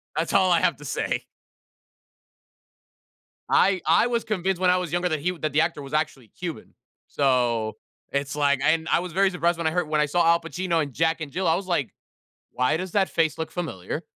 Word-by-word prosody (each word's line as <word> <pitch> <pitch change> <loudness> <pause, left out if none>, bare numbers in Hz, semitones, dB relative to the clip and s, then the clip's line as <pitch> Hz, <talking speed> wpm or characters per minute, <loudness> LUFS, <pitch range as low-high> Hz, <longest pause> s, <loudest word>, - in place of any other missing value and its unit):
That's 160 +1 -1
all 190 -2 +4
I 170 -1 +4
have 170 -5 +2
to 145 - -12
say. - - -2 2.2
I 190 0 +3
I 170 +9 +4
was 235 -1 -1
convinced 190 -3 -1
when 180 -1 +4
I 180 - +4
was 180 -4 -3
younger 175 +1 +1
that 155 -3 -2
he 175 +5 0
that 155 -2 -2
the 150 - +3
actor 160 -2 0
was 135 0 -10
actually 150 -6 -2
Cuban. 170 - -7 0.3
So, 120 -6 +1 0.4
it's 140 +1 -2
like 145 -2 +2
and 160 +1 +2
I - - +3
was 180 -1 -6
very 195 +2 +3
surprised 175 -2 0
when 170 - -2
I - - +3
heard 175 -1 -1
when 155 -1 +1
I 150 - +3
saw 170 +3 +1
Al 170 0 +4
Pacino 170 0 -1
in 140 -2 -6
Jack 165 +4 +1
and 150 -3 -6
Jill, 185 0 -1
I 160 - +4
was 185 +2 -3
like, 170 -8 -1 0.6
"Why 125 +4 +1
does 185 +1 -5
that 195 -2 +2
face 160 -2 0
look 160 - -4
familiar?" 150 - -5
165 Hz, 215 wpm, -25 LUFS, 145-180 Hz, 2.2 s, all